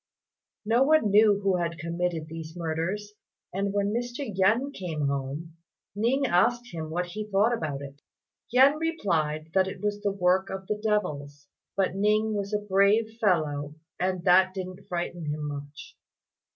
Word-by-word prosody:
No 230 +4 +3
one 275 -6 +4
knew 205 -1 +5
who 195 -2 +2
had 170 -1 -2
committed 170 0 -2
these 160 0 -8
murders, 175 +6 -3 0.4
and 200 +1 -1
when 200 +1 0
Mr. 245 +4 -3
Yen 220 +9 +2
came 165 - -3
home, 140 +4 -3 0.4
Ning 245 +6 +1
asked 240 +4 +2
him 160 -2 -5
what 175 +3 -1
he 210 +4 -6
thought 210 +4 +3
about 145 -8 -4
it. 140 +1 -11 0.5
Yen 270 +5 +5
replied 160 - -1
that 190 0 +3
it 190 - -6
was 205 +1 -2
the 205 -1 0
work 190 0 +2
of 190 0 -6
devils, 145 -10 -2 0.3
but 195 -2 +1
Ning 215 +2 +2
was 200 -1 -3
a 210 - +2
brave 210 +3 +2
fellow, 150 -7 +1 0.2
and 185 -1 -1
that 185 +1 +5
didn't 185 +1 -7
frighten 175 -3 -4
him 150 0 -3
much. 145 0 -8
190 Hz, 155 wpm, -27 LUFS, 160-210 Hz, 0.5 s, knew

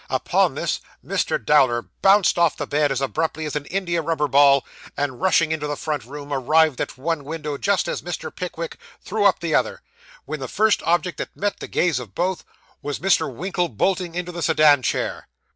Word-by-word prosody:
Upon - - +1
this, - - -2 0.2
Mr. - - 0
Dowler 120 -2 +3 0.2
bounced 195 -2 +4
off 170 -2 +3
the - - -3
bed 145 -1 +1
as 135 0 -1
abruptly 155 +3 -2
as 150 - -4
an 145 -1 -3
India 175 -3 -1
rubber 155 -2 0
ball, 140 0 +5 0.3
and 140 -2 -2
rushing 170 -4 +3
into 150 -2 -2
the 145 - -2
front 145 -5 -3
room, 145 +2 -7
arrived 155 +2 +3
at - - -4
one 155 +2 -2
window 150 0 -4
just 200 +6 0
as - - -3
Mr. 175 -1 -6
Pickwick 170 -2 -5 0.3
threw 210 +1 -1
up 195 -2 +4
the 165 -2 -2
other, - - 0 0.4
when 155 +1 -5
the 130 - -5
first 215 - +2
object 175 +1 +1
that - - -6
met 205 0 -2
the - - -6
gaze 170 -7 +1
of 115 -6 -10
both, 180 0 -1 0.4
was 145 -1 -3
Mr. 190 -6 +2
Winkle 180 +5 -2
bolting 175 - -1
into 180 0 -3
the 170 0 -6
sedan 155 -3 +5
chair. - - -2
155 Hz, 195 wpm, -22 LUFS, 145-175 Hz, 0.4 s, ball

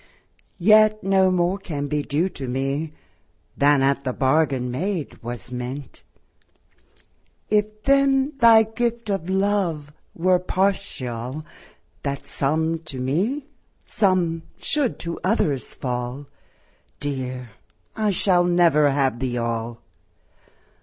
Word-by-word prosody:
Yet 215 +3 +5
no 190 0 +4
more 180 +1 +1
can 145 -7 -4
be 150 0 -1
due 150 +5 0
to 135 -7 -7
me, 135 +5 -2 0.6
Than 140 -1 +4
at 140 0 +1
the 130 - -2
bargain 130 -2 +1
made 175 +4 -3
was 120 +1 -7
meant, 125 +2 -6 1.5
If 215 0 0
then 275 +1 +3
thy 230 -2 +7
gift 230 0 -2
of 185 -3 -2
love 190 -7 0 0.2
were 180 +1 +3
partial, 155 - -2 0.6
That 140 -1 -4
some 160 +4 0
to 135 -4 -7
me, 190 - -1 0.4
some 180 -5 +1 0.2
should 290 -6 -1
to 170 0 -5
others 155 - 0
fall, 125 +2 -4 0.7
Dear, 130 -4 -4 0.4
I 215 -1 +1
shall 180 -2 +3
never 170 -4 +4
have 135 -3 +1
Thee 125 -1 -2
All. 115 0 -3
160 Hz, 110 wpm, -23 LUFS, 135-195 Hz, 1.5 s, thy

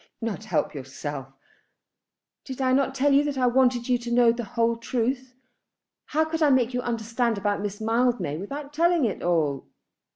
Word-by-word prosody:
"Not 220 -2 -4
help - - -1
yourself!" 135 0 -6 1.2
"Did 260 -1 -8
I 260 -1 +2
not 270 0 +1
tell 280 +1 +3
you 280 +1 +5
that 290 -2 -2
I 255 - +2
wanted 245 -1 +2
you 250 -1 +2
to 240 0 -6
know 240 -1 +5
the 235 +1 -4
whole 230 0 +2
truth? 250 +2 -2 0.7
How 315 +1 +1
could 320 +1 -3
I 300 - +5
make 255 -2 +3
you 250 - -1
understand 230 -1 -1
about 205 0 -1
Miss 205 0 -4
Mildmay 230 - 0
without 280 - -7
telling 335 -1 +3
it 210 - -2
all? 155 -6 0
240 Hz, 175 wpm, -25 LUFS, 215-265 Hz, 1.2 s, you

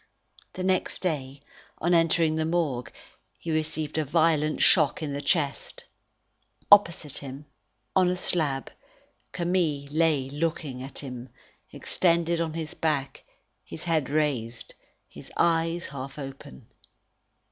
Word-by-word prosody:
The 185 - -5
next 185 -1 0
day, 140 -6 -3 0.4
on 175 +2 +1
entering 165 -1 +3
the 160 0 0
Morgue, 155 -7 -1 0.5
he 165 - -5
received 155 0 -1
a - - +2
violent 155 0 +2
shock 160 +1 +4
in 145 -2 -3
the 140 - -3
chest. 145 -1 -1 0.9
Opposite 170 -7 +5
him, 140 +1 -8 0.5
on 185 -1 +5
a 180 - +1
slab, 155 -7 0 0.6
Camille 170 -5 0
lay 155 -4 +2
looking 150 -3 -2
at 135 +1 -8
him, 125 -2 -6 0.4
extended 170 -1 +1
on 160 -1 -2
his 160 -2 -3
back, 145 -4 -2 0.4
his 155 - -9
head 160 -5 0
raised, 135 -6 -1 0.3
his - - -13
eyes 165 0 +2
half 135 0 -7
open. 135 - -9
155 Hz, 125 wpm, -27 LUFS, 140-165 Hz, 0.9 s, Opposite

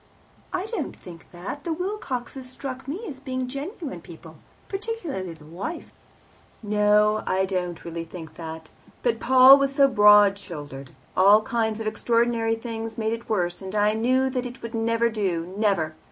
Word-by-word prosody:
" - - -31
"I 370 0 -2
don't 445 +1 -4
think 170 -2 -13
that. 185 +11 -7
The 335 - -1
Wilcoxes 275 -9 -4
struck 260 0 -7
me 360 +12 -5
as 275 -6 -7
being 255 -1 -3
genuine 285 - -6
people, - - -13 0.3
particularly 375 - -4
the 150 -1 -16
wife." 195 - -6 0.7
"No, 210 0 +3
I 190 +1 +2
don't 180 -3 -3
really 170 0 -4
think 165 -2 -10
that. 160 -1 -8 0.3
But 475 - +1
Paul 260 +2 +8
was 275 0 0
so 275 -1 +6
broad 205 -4 +6
shouldered; 145 -7 -8 0.3
all 205 +3 +6
kinds 225 -3 -1
of 225 - -4
extraordinary 230 +1 +1
things 225 -1 -6
made 220 0 0
it 230 0 -7
worse, 175 -5 -1
and 190 +1 -6
I 210 0 +3
knew 255 +4 +2
that 250 -1 -2
it 245 0 -12
would 230 +1 -6
never 230 +1 +1
do 185 -6 -2
never. 195 -7 +1
225 Hz, 170 wpm, -25 LUFS, 190-260 Hz, 0.7 s, Paul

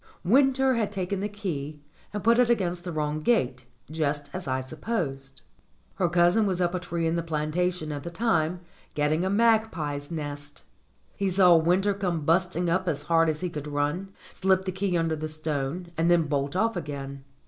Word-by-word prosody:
Winter 265 +4 +4
had 220 -4 0
taken 195 -1 -2
the 205 +2 -2
key 155 -8 -5 0.3
and 210 -1 -4
put 230 +2 +4
it 245 -1 +4
against 180 -6 0
the 175 - -4
wrong 150 -1 -1
gate, 130 - +1 0.2
just 145 -2 -2
as 185 -4 -5
I 130 0 0
supposed. 135 - -4 0.5
Her 180 -2 +2
cousin 175 +5 +4
was 185 -2 -1
up 175 -1 +1
a 180 - -1
tree 170 -2 -3
in 165 +1 +1
the 170 - 0
plantation 160 +1 -1
at 145 -1 -4
the 170 - -6
time, 170 -3 0 0.3
getting 150 +3 +1
a 190 - 0
magpie's 200 -10 +1
nest. 145 -2 -6 0.5
He 200 -1 0
saw 180 -2 +6
Winter 180 +5 +3
come 180 -5 -2
busting 175 +1 +1
up 185 +2 +1
as 145 -3 -1
hard 165 +1 +3
as 155 +1 -2
he 180 - -1
could 150 -2 -6
run, 150 +7 -2 0.2
slip 190 0 +2
the 185 - -1
key 190 -1 -1
under 165 -1 0
the 155 0 -4
stone, 155 +2 -3
and 165 +1 +2
then 175 -1 +5
bolt 145 -1 -2
off 225 +3 +1
again. 140 -4 -6
170 Hz, 190 wpm, -27 LUFS, 150-190 Hz, 0.5 s, saw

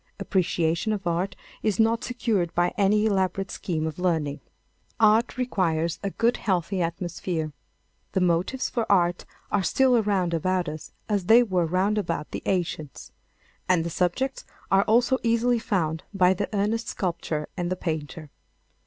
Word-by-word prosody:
Appreciation 170 +2 0
of 200 -2 -4
art 175 +3 -1 0.3
is 215 -1 0
not 225 +2 +3
secured 215 -9 -1
by 175 0 +2
any 210 +1 +3
elaborate 195 -2 0
scheme 160 -4 -3
of 160 +1 -5
learning. 160 -5 0 0.6
Art 220 +3 +4
requires 170 -10 0
a 200 - -2
good 230 +4 +1
healthy 185 -1 -1
atmosphere. 170 -2 -3 0.6
The 190 - +2
motives 180 +9 +1
for 230 -3 -2
art 175 -2 +2 0.3
are 205 - +2
still 260 +6 +3
around 200 -6 +1
about 180 +2 0
us 155 0 -7 0.2
as 205 -4 0
they 230 +5 +7
were 185 -6 0
round 190 +5 +1
about 165 -6 -3
the - - -4
ancients. 160 -6 -3 0.6
And 180 -3 +3
the 170 - -3
subjects 215 +12 -1 0.3
are 195 0 +6
also 240 +4 +3
easily 235 +1 +2
found 165 -9 -1
by 185 -1 +5
the 200 +2 -3
earnest 215 +2 0
sculptor 165 -4 -3
and 175 -2 -2
the - - +1
painter. 155 -3 -5
185 Hz, 155 wpm, -25 LUFS, 170-215 Hz, 0.6 s, they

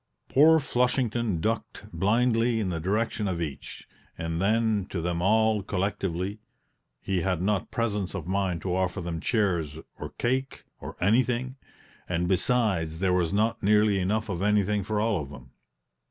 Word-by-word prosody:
Poor 160 +4 +6
Flushington 120 - 0
ducked 110 +7 -3
blindly 115 +5 +2
in 95 -4 -1
the 85 - -2
direction 105 +4 -1
of 90 -3 -2
each, 75 -5 -6 0.3
and 80 +1 -3
then 110 -1 +1
to 90 - -3
them 85 0 -2
all 110 +2 +3
collectively: 95 0 -2 0.6
he 95 -2 -1
had 95 -2 0
not 95 +2 0
presence 105 -5 -2
of 90 -5 -4
mind 95 -3 -1
to 90 -2 -1
offer 95 -1 -1
them 85 -2 -4
chairs 85 -9 0 0.2
or - - -5
cake, 130 +2 -1 0.2
or - - -8
anything; 125 +5 +1 0.5
and 85 0 0
besides, 95 -5 +1
there 90 +1 +1
was 85 -3 +1
not 110 +3 +1
nearly 105 -1 +3
enough 105 +4 0
of 90 -4 -3
anything 105 0 +2
for 105 +2 -1
all 105 -5 +1
of 70 - -8
them. 65 -3 -12
100 Hz, 155 wpm, -27 LUFS, 90-110 Hz, 0.6 s, Poor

